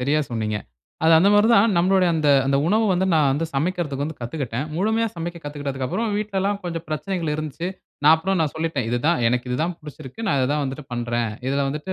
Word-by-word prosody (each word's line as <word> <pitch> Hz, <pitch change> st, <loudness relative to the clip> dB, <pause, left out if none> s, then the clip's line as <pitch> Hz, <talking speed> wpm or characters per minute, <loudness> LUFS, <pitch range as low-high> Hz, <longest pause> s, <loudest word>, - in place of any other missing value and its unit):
சரியாசொன்னீங்க. 125 Hz, -6 st, -1 dB, 0.5 s
அது, 165 Hz, -, +6 dB
அந்த 195 Hz, +4 st, +5 dB
மாதிரி 205 Hz, +2 st, +5 dB
தான் 220 Hz, +1 st, +5 dB
நம்முளுடைய 185 Hz, +1 st, +3 dB
அந்த 155 Hz, -2 st, +1 dB, 0.2 s
அந்த 140 Hz, 0 st, +2 dB
உணவு 220 Hz, +5 st, +3 dB
வந்து 185 Hz, +1 st, +1 dB
நான் 150 Hz, -3 st, +4 dB
வந்து 160 Hz, +4 st, -1 dB
சமைக்கறதுக்கு 150 Hz, -2 st, -1 dB
வந்து 155 Hz, 0 st, -6 dB
கத்துக்கிட்டேன். 125 Hz, +1 st, -4 dB
முழுமையா 220 Hz, +5 st, +1 dB
சமைக்க 170 Hz, +1 st, -5 dB
கத்துக்கிட்டதுக்கு 140 Hz, -3 st, -4 dB
அப்புறம் 220 Hz, -, -2 dB
வீட்டுலல்லாம் 200 Hz, -1 st, -1 dB
கொஞ்சம் 170 Hz, -1 st, -4 dB
பிரச்சனைகள் 165 Hz, +1 st, -2 dB
இருந்துச்சு. 155 Hz, +3 st, -4 dB, 0.4 s
நான் 155 Hz, +2 st, +8 dB
அப்புறம் 190 Hz, +3 st, -1 dB
நான் 155 Hz, -3 st, 0 dB
சொல்லிட்டேன். 160 Hz, -6 st, -2 dB
"இது 120 Hz, -, +1 dB
தான் 170 Hz, 0 st, +3 dB
எனக்கு 125 Hz, +1 st, -1 dB
இது 125 Hz, -, 0 dB
தான் 175 Hz, +2 st, -1 dB
பிடிச்சுருக்கு. 150 Hz, -, -9 dB
நான் 140 Hz, -, +2 dB
இத 130 Hz, -, +2 dB
தான் 150 Hz, 0 st, 0 dB
வந்துட்டு 135 Hz, +2 st, -5 dB
பண்றேன். 120 Hz, -1 st, -1 dB, 0.2 s
இதில 140 Hz, +1 st, 0 dB
வந்துட்டு 150 Hz, +6 st, -4 dB
155 Hz, 200 wpm, -22 LUFS, 135-185 Hz, 0.5 s, நான்